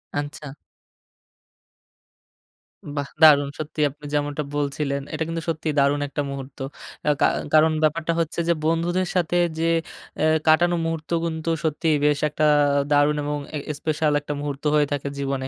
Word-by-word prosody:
আচ্ছা 145 +1 -4 2.5
বাহ! 140 -1 -2 0.2
দারুণ 145 -2 +7
সত্যিই 155 0 -1
আপনি 145 +2 -15
যেমনটা 145 0 -1
বলছিলেন। 140 -1 -1
এটা 155 +1 -1
কিন্তু 165 0 -3
সত্যিই 160 -1 -2
দারুণ 140 +1 +3
একটা 140 +1 -3
মুহূর্ত। 135 -1 -8 0.5
আ - - +5
কা - - +6 0.3
কারণ 155 +1 +6
ব্যাপারটা 160 +2 +1
হচ্ছে 165 0 -2
যে 170 - +4
বন্ধুদের 175 +3 +1
সাথে 175 0 +1 0.2
যে 165 - +2 0.5
অ্যাঁ 155 +1 +3
কাটানো 175 +3 +4
মুহূর্ত 165 -1 -4 0.2
কিন্তু 160 0 -3
সত্যিই 160 0 +1
বেশ 150 -1 +3
একটা 150 +1 0 0.5
দারুণ 145 +1 +4
এবং 145 0 -2 0.2
এ 150 - -2 0.2
স্পেশাল 155 -1 0
একটা 145 +1 -4
মুহূর্ত 145 -1 -5
হয়ে 150 -1 +3
থাকে 140 -1 -3
জীবনে। 135 -1 -2
150 Hz, 145 wpm, -23 LUFS, 145-160 Hz, 2.5 s, দারুণ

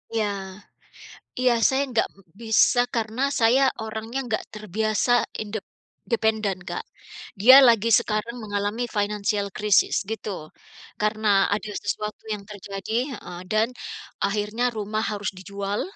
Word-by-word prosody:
Iya, 220 -2 +2 1.1
iya, 255 -1 +4 0.2
saya 265 +1 +1
nggak 235 - +1 0.3
bisa 230 +2 +4
karena 225 +2 -1 0.2
saya 235 +4 +5 0.2
orangnya 220 +3 -5
nggak 220 - -1
terbiasa 215 +3 0 0.3
indep 210 -1 -5 0.5
dependen, 220 -4 +1
Kak. 445 - -4 0.6
Dia 255 +6 +9
lagi 230 -1 +4
sekarang 230 +1 -3
mengalami 205 +3 -2
financial 205 0 0
crisis 210 -1 +3 0.2
gitu, 220 -1 -4 0.7
karena 215 +1 0 0.3
ada 215 +1 -3
sesuatu 210 +2 -3
yang 205 -1 -6
terjadi 200 +1 -7 0.2
heeh, 175 -6 -8
dan 215 +1 +3 0.6
akhirnya 210 +4 -1
rumah 215 +1 -2
harus 205 -1 -4
dijual. 200 +1 -3
215 Hz, 115 wpm, -24 LUFS, 205-225 Hz, 1.1 s, Dia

